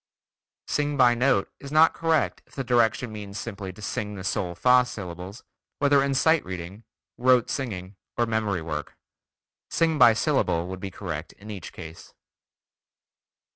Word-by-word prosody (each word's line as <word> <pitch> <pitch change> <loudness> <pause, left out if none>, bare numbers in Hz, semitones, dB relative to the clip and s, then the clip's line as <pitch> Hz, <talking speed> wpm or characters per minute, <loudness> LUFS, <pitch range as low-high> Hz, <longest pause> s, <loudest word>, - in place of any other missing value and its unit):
"Sing 145 -1 -1
by 125 -2 +6
note" 120 -4 +1
is 140 - -9
not 155 +2 +6
correct 165 -2 0
if - - -21
the 135 - -2
direction 120 -1 +2
means 105 -2 -7
simply 100 -4 -6
to 100 +3 -13
sing 105 +1 -3
the 95 - -7
sol 90 -2 -2
fa 125 +4 +5
syllables, 95 -2 -8 0.3
whether 145 -1 +4
in 140 0 0
sight 160 +3 +3
reading, 95 +3 -7 0.4
rote 125 -1 +4
singing, 100 -8 -4 0.2
or 120 - +3
memory 110 -6 -1
work. 75 -2 -5 0.7
"Sing 160 -2 +1
by 120 -3 +8
syllable" 115 - +1
would 95 0 -6
be 95 - -5
correct 85 -4 -6
in 105 +2 -11
each 95 -5 -7
case. 80 -2 -11
110 Hz, 155 wpm, -26 LUFS, 95-130 Hz, 0.7 s, by